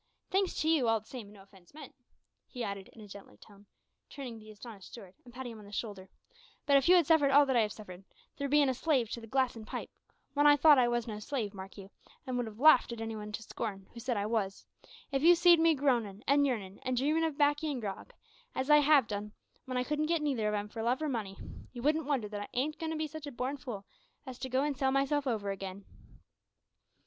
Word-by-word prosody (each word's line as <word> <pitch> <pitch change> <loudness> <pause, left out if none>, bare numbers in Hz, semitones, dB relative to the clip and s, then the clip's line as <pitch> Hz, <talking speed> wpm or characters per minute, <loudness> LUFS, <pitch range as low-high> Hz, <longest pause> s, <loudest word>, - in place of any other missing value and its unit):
Thanks 385 0 +1
to 310 - 0
you, 310 -7 +3
all 225 0 +3
the 215 - -25
same, 240 -4 -8
an' 205 - -15
no 195 -2 -15
offence 195 +4 -21
meant," 300 -4 -11 0.5
he 245 -2 -6
added 200 -2 -5
in 225 - -15
a 210 - -11
gentler 195 - -13
tone, 205 - -18 0.4
turning 250 -6 -8
to - - -15
the 215 - -14
astonished 210 -2 -11
steward, 195 -6 -12
and 245 - -14
patting 250 0 -7
him 225 - -10
on 210 - -13
the 200 - -13
shoulder, 200 -3 -5 0.6
"but 280 - +4
if 275 +3 +4
you 365 - +8
had 345 -3 +5
suffered 300 -3 +4
all 285 +1 +6
that 265 -2 0
I 235 - +5
have 210 -1 0
suffered 190 -3 -10 0.3
through 280 -1 -3
bein' 290 0 +4
a 260 - +1
slave 255 -4 0
to 235 - -5
the 225 - -10
glass 260 +1 +1
and 225 - -8
the - - -15
pipe - - -5 0.4
when 290 0 +4
I 290 0 +7
thought 295 -1 +7
I 245 - +4
was 240 -1 0
no 215 -2 -6
slave, 220 -3 -3
mark 195 0 -10
you, 195 0 -11 0.3
an' 255 -2 -3
would 245 -2 -1
have 215 -1 -10
larfed 270 -2 +6
any 225 0 -4
one 210 0 -7
to 225 - -5
scorn 195 -3 -5
who'd 235 - -9
said 245 -2 -1
I 200 - -1
wos 210 -3 -2 0.5
if 270 -1 0
you'd 345 +3 +7
see'd 345 0 +6
me 325 -1 +4
groanin', 235 -7 0
an 285 +1 +4
yearnin', 205 -7 -3
an' 255 0 -2
dreamin' 300 +6 +1
of 315 -3 -1
baccy 290 +1 +2
an' 275 -4 -2
grog, 200 -4 -6 0.4
as 265 +3 0
I 300 - +9
have 295 -3 +5
done 210 0 -5 0.3
w'en 255 -1 -3
I 250 - +1
couldn't 300 +1 0
get 330 -2 0
neither 255 -8 0
of 210 - 0
'em 205 0 -3
for 225 +2 -7
love 245 +6 0
or 305 - 0
money 210 -7 -4 0.4
you 240 -2 -7
wouldn't 305 0 +1
wonder 265 -8 0
that 205 0 -6
I 205 - -6
ain't 290 +5 -1
goin' 320 - -3
to 320 - -3
be 310 - -1
such 310 0 -8
a - - -6
born 255 +3 -3
fool 230 -8 -7 0.4
as 255 -2 -8
to 260 - -5
go 260 +2 +1
an' 295 0 0
sell 270 -1 0
myself 275 +1 +1
over 210 -5 -1
again!" 195 0 -7
245 Hz, 260 wpm, -31 LUFS, 210-290 Hz, 0.6 s, I